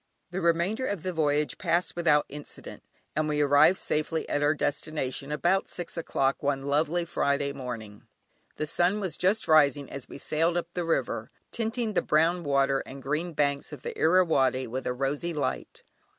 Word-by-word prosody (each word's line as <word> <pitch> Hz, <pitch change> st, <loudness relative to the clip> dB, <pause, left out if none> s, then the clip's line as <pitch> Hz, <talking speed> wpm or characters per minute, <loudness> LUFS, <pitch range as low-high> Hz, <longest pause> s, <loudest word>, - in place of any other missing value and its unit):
The 190 Hz, +2 st, -3 dB
remainder 175 Hz, +9 st, +1 dB
of 200 Hz, -6 st, -3 dB
the 185 Hz, -, -2 dB
voyage 150 Hz, -2 st, 0 dB
passed 175 Hz, 0 st, 0 dB
without 155 Hz, -4 st, +3 dB
incident, 145 Hz, +1 st, -9 dB, 0.3 s
and 155 Hz, 0 st, 0 dB
we 150 Hz, 0 st, 0 dB
arrived 145 Hz, +5 st, +5 dB
safely 155 Hz, +1 st, -1 dB
at 145 Hz, -, 0 dB
our 145 Hz, +1 st, +3 dB
destination 145 Hz, -2 st, -2 dB
about 175 Hz, +6 st, +1 dB
six 175 Hz, -1 st, -5 dB
o'clock 135 Hz, -5 st, 0 dB
one 140 Hz, -1 st, 0 dB
lovely 155 Hz, +5 st, +1 dB
Friday 140 Hz, -3 st, 0 dB
morning. 115 Hz, -6 st, -7 dB, 0.5 s
The 155 Hz, -, -2 dB
sun 175 Hz, +6 st, +1 dB
was 190 Hz, -5 st, -2 dB
just 195 Hz, +4 st, +1 dB
rising 145 Hz, -3 st, +4 dB
as 140 Hz, -2 st, -7 dB
we -, -, -8 dB
sailed 165 Hz, +4 st, 0 dB
up 175 Hz, -, -4 dB
the 175 Hz, -1 st, -2 dB
river, 165 Hz, -, -1 dB, 0.2 s
tinting 225 Hz, -1 st, -2 dB
the -, -, +2 dB
brown 165 Hz, +3 st, +2 dB
water 140 Hz, -1 st, +2 dB
and 135 Hz, -, -10 dB
the 135 Hz, -, -12 dB
green 155 Hz, +5 st, -2 dB
banks 140 Hz, -1 st, 0 dB
of 145 Hz, -4 st, -9 dB
the -, -, -5 dB
Irrawaddy 160 Hz, -7 st, +3 dB
with 130 Hz, +3 st, -4 dB
a 125 Hz, -, 0 dB
rosy 140 Hz, +6 st, -2 dB
light. 150 Hz, -, -3 dB
150 Hz, 180 wpm, -28 LUFS, 140-175 Hz, 0.5 s, arrived